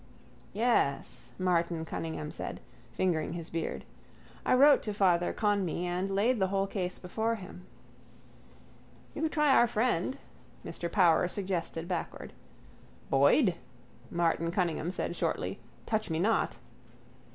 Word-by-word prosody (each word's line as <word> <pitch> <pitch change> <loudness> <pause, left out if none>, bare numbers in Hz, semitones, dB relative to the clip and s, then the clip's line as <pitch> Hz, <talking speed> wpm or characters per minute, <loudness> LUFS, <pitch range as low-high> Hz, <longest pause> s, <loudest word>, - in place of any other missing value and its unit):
—Yes, 210 - 0
Martin 170 -3 0
Cunningham 160 -2 -4
said, - - -6 0.3
fingering 165 +3 0
his 170 -1 -7
beard. 165 0 -3 0.6
I - - +3
wrote 280 +2 +7
to 210 -2 -4
Father 175 -3 +3
Conmee 200 -5 0
and 180 +2 -1
laid 215 +5 +2
the 190 - +2
whole 195 0 0
case 185 -2 -3
before 220 +5 -1
him. 185 -3 -11 1.5
—You - - -5
could 320 -1 0
try 300 -3 +4
our 240 - +6
friend, 230 +1 0 0.5
Mr 170 -1 -5
Power 175 -3 +4
suggested 180 -3 -3
backward. 175 -2 -4 0.8
—Boyd? 155 - +5 0.6
Martin 165 -1 +1
Cunningham 175 -2 -1
said 175 -1 -3
shortly. - - -2 0.3
Touch 220 -2 -1
me 160 - -1
not. 215 +7 +1
180 Hz, 125 wpm, -30 LUFS, 170-210 Hz, 1.5 s, wrote